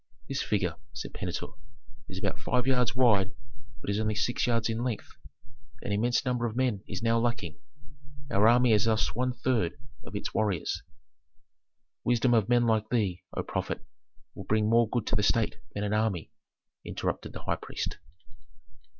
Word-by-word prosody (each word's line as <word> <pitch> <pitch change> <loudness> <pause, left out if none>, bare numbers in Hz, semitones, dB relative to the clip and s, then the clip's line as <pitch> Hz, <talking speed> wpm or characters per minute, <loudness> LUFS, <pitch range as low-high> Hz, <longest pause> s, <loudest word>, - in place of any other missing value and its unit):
"This 135 - -1
figure," 90 -5 0 0.2
said 115 - -6
Pentuer, 90 -4 -4 0.6
"is 95 - -6
about 115 - -2
five 125 +2 +1
yards 125 -3 +2
wide, 105 -5 +4 0.5
but - - -5
is 100 - 0
only 110 -1 0
six 115 +3 +1
yards 115 -2 +2
in 115 +1 -1
length. 120 -4 -3 0.7
An - - -3
immense 120 +6 +2
number 125 -2 +1
of 110 - -5
men 125 -6 +1
is 95 +3 -4
now 115 0 +3
lacking, 120 -1 -1 0.7
our 105 +3 +5
army 120 +1 +6
has 105 0 +4
lost 110 -1 +2
one 125 +2 +1
third 120 -8 0 0.3
of - - -9
its - - -3
warriors." 100 -7 0 1.2
"Wisdom 120 +1 +3
of 110 -2 +3
men 120 -1 +5
like 110 -1 +2
thee, 100 -7 0 0.2
O - - 0
prophet, - - -3 0.5
will 95 - -8
bring 105 +2 +2
more 115 0 +4
good 120 -2 -1
to - - 0
the 105 - +3
state 110 +1 +2 0.2
than 100 - -1
an 105 0 0
army," 105 -6 0 0.5
interrupted - - -3
the - - -7
high - - 0
priest. - - -4
115 Hz, 170 wpm, -29 LUFS, 105-120 Hz, 1.2 s, army